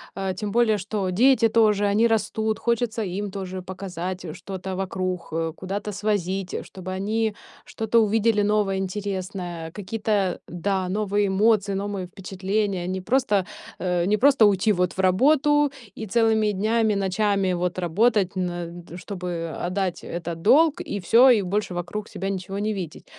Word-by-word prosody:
А 195 Hz, -1 st, -2 dB
тем 205 Hz, +3 st, -4 dB
более 225 Hz, -1 st, +3 dB
что 200 Hz, 0 st, -2 dB
дети 240 Hz, +5 st, +4 dB
тоже- 210 Hz, -2 st, +3 dB
они 210 Hz, +3 st, +3 dB
растут, 220 Hz, -1 st, 0 dB
хочется 235 Hz, -1 st, 0 dB
им 200 Hz, +1 st, -4 dB
тоже 185 Hz, -1 st, -5 dB
показать, 185 Hz, -1 st, -6 dB
э, 155 Hz, -, -6 dB
что-то 190 Hz, +1 st, -6 dB
вокруг, 185 Hz, -1 st, -3 dB
э, 165 Hz, 0 st, -2 dB
куда-то 200 Hz, +3 st, -4 dB
свозить, 195 Hz, -2 st, -2 dB
э, -, -, -3 dB
чтобы 185 Hz, -1 st, -8 dB
они 210 Hz, +3 st, -1 dB, 0.3 s
что-то 225 Hz, +1 st, 0 dB
увидели 220 Hz, 0 st, +2 dB
новое, 205 Hz, -2 st, +1 dB
интересное, 185 Hz, -3 st, -4 dB
какие-то, 205 Hz, -1 st, -1 dB
да, 185 Hz, +1 st, -2 dB
новые 205 Hz, +1 st, 0 dB
эмоции, 205 Hz, 0 st, +2 dB
новые 195 Hz, -1 st, -3 dB
впечатления. 190 Hz, 0 st, -2 dB
Не 185 Hz, 0 st, -3 dB
просто, 210 Hz, -3 st, +1 dB, 0.3 s
э, 180 Hz, -1 st, 0 dB
не 210 Hz, +3 st, +2 dB
просто 265 Hz, -1 st, +5 dB
уйти 205 Hz, +1 st, +3 dB
вот 180 Hz, -3 st, +1 dB
в -, -, -11 dB
работу 290 Hz, +9 st, +3 dB, 0.2 s
и 220 Hz, -, -5 dB
целыми 220 Hz, 0 st, +2 dB
днями, 215 Hz, +2 st, +1 dB
ночами 195 Hz, -1 st, +1 dB
вот 180 Hz, 0 st, -2 dB
работать, 195 Hz, +2 st, +2 dB
на 175 Hz, -1 st, -4 dB
чтобы 175 Hz, -3 st, -5 dB
отдать 185 Hz, 0 st, -2 dB
этот 170 Hz, -1 st, -5 dB
долг 320 Hz, -, +4 dB
и 290 Hz, -, -4 dB
всё, 230 Hz, +9 st, +6 dB
и 235 Hz, -5 st, +5 dB
больше 195 Hz, 0 st, -2 dB
вокруг 175 Hz, +5 st, -5 dB
себя 195 Hz, +2 st, -4 dB
ничего 195 Hz, 0 st, -4 dB
не 215 Hz, +1 st, -1 dB
видеть. 180 Hz, -6 st, -6 dB
195 Hz, 155 wpm, -24 LUFS, 185-215 Hz, 0.3 s, всё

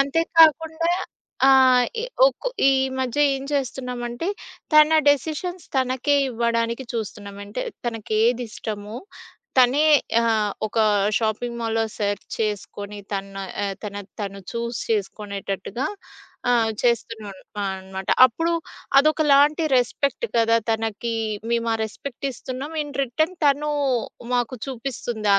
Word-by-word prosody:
అంతేకాకుండా 325 Hz, +2 st, +3 dB, 0.6 s
ఆహ్, 260 Hz, -2 st, +6 dB
ఈ -, -, -2 dB, 0.2 s
ఒక్ -, -, -2 dB, 0.2 s
ఈ -, -, +6 dB, 0.3 s
మధ్య 260 Hz, +1 st, -2 dB
ఏం 270 Hz, 0 st, -3 dB
చేస్తున్నామంటే, 250 Hz, +1 st, -3 dB, 0.5 s
తన 305 Hz, +1 st, +7 dB
డెసిషన్స్ 320 Hz, +6 st, 0 dB
తనకే 260 Hz, +2 st, +1 dB, 0.2 s
ఇవ్వడానికి 235 Hz, +1 st, -1 dB
చూస్తున్నాం. 205 Hz, -3 st, -5 dB
అంటే 205 Hz, -, -5 dB, 0.2 s
తనకేదిష్టమో, 220 Hz, -1 st, -2 dB, 0.6 s
తనే 260 Hz, +4 st, +5 dB, 0.4 s
ఆహ్, 220 Hz, -3 st, +1 dB, 0.2 s
ఒక 225 Hz, -, -3 dB, 0.4 s
షాపింగ్ 235 Hz, +2 st, -2 dB
మాల్‌లో 225 Hz, 0 st, 0 dB
సెర్చ్ 205 Hz, -1 st, -2 dB
చేసుకొని 205 Hz, -1 st, -4 dB
తన 195 Hz, 0 st, -2 dB, 0.6 s
తన 205 Hz, -2 st, -6 dB, 0.3 s
తను 200 Hz, -1 st, -5 dB
చూజ్ 235 Hz, 0 st, -3 dB
చేసుకునేటట్టుగా 200 Hz, +1 st, -3 dB, 0.6 s
ఆహ్, 230 Hz, -2 st, +3 dB
చేస్తున్నాం 230 Hz, -3 st, -1 dB, 0.3 s
అన్ -, -, -1 dB, 0.2 s
అనమాట. 190 Hz, 0 st, -8 dB, 0.2 s
అప్పుడు 330 Hz, +8 st, +2 dB, 0.5 s
అదొకలాంటి 300 Hz, +1 st, +4 dB
రెస్పెక్ట్ 275 Hz, -, +1 dB
కదా! 230 Hz, 0 st, +4 dB
తనకి 225 Hz, +1 st, -2 dB, 0.4 s
మేమా 235 Hz, -1 st, +1 dB
రెస్పెక్ట్ 245 Hz, +5 st, -7 dB
ఇస్తున్నాం 260 Hz, +4 st, -6 dB
ఇన్ 290 Hz, -1 st, -8 dB
రిటర్న్ 315 Hz, +8 st, 0 dB
తను 290 Hz, +1 st, +2 dB, 0.6 s
మాకు 245 Hz, +1 st, 0 dB
చూపిస్తుంది 240 Hz, -4 st, -4 dB
ఆ -, -, +4 dB
240 Hz, 105 wpm, -23 LUFS, 220-280 Hz, 0.6 s, తన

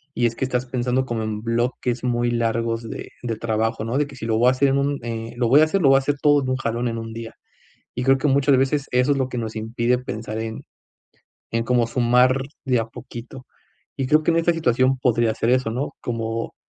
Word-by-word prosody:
y 120 Hz, -, +1 dB
es 115 Hz, -, -4 dB
que 130 Hz, -, -1 dB
estás 125 Hz, 0 st, -1 dB
pensando 125 Hz, +1 st, 0 dB
como 115 Hz, -3 st, -3 dB
en 105 Hz, -1 st, -3 dB
bloques 120 Hz, +1 st, -1 dB
muy 120 Hz, -1 st, +1 dB
largos 115 Hz, 0 st, -1 dB
de -, -, -7 dB
de 115 Hz, -2 st, -2 dB
trabajo, 110 Hz, -1 st, -1 dB
¿no? 120 Hz, +4 st, -1 dB
De 150 Hz, -, +2 dB
que 140 Hz, -, -12 dB
sí 115 Hz, -, -6 dB
lo 110 Hz, -1 st, +1 dB
voy 125 Hz, +2 st, +5 dB
a -, -, +4 dB
hacer 135 Hz, +1 st, +2 dB
en 135 Hz, -, +2 dB
un, 140 Hz, 0 st, 0 dB
eh, 115 Hz, 0 st, -5 dB
lo 120 Hz, -2 st, +1 dB
voy 145 Hz, +4 st, +7 dB
a -, -, +6 dB
hacer 185 Hz, +4 st, 0 dB
lo 140 Hz, -, +5 dB
voy 135 Hz, -, +6 dB
a -, -, +4 dB
hacer 140 Hz, +1 st, -1 dB
todo 145 Hz, -1 st, +4 dB
en 130 Hz, -, -3 dB
un 130 Hz, -, 0 dB
jalón, 120 Hz, -1 st, -2 dB
en 115 Hz, -, -4 dB
1 115 Hz, 0 st, -7 dB
día, 115 Hz, 0 st, -7 dB, 0.6 s
y 125 Hz, -, -3 dB
creo 135 Hz, 0 st, +5 dB
que 145 Hz, -, +1 dB
muchas 140 Hz, 0 st, +4 dB
veces 135 Hz, +2 st, +1 dB
eso 125 Hz, +3 st, +3 dB
es 140 Hz, -, 0 dB
lo 130 Hz, -1 st, 0 dB
que 125 Hz, -, -4 dB
nos 110 Hz, -1 st, -4 dB
impide 115 Hz, +3 st, 0 dB
pensar 110 Hz, -3 st, -5 dB
en 110 Hz, 0 st, -5 dB, 0.9 s
en 115 Hz, 0 st, 0 dB
cómo 120 Hz, -1 st, +2 dB
sumar 125 Hz, +2 st, +3 dB, 0.2 s
de 125 Hz, -3 st, +2 dB
a 110 Hz, -, -1 dB
poquito, 120 Hz, +3 st, -10 dB, 0.5 s
y 135 Hz, -, +1 dB
creo 155 Hz, +2 st, +4 dB
que -, -, +1 dB
en 165 Hz, -, +2 dB
esta 165 Hz, +1 st, +2 dB
situación 130 Hz, -4 st, +2 dB
podría 120 Hz, -3 st, +2 dB
ser 115 Hz, -, 0 dB
eso, 125 Hz, -3 st, +1 dB
¿no?, 130 Hz, +5 st, -3 dB
como 115 Hz, -1 st, -3 dB
125 Hz, 250 wpm, -22 LUFS, 115-135 Hz, 0.9 s, voy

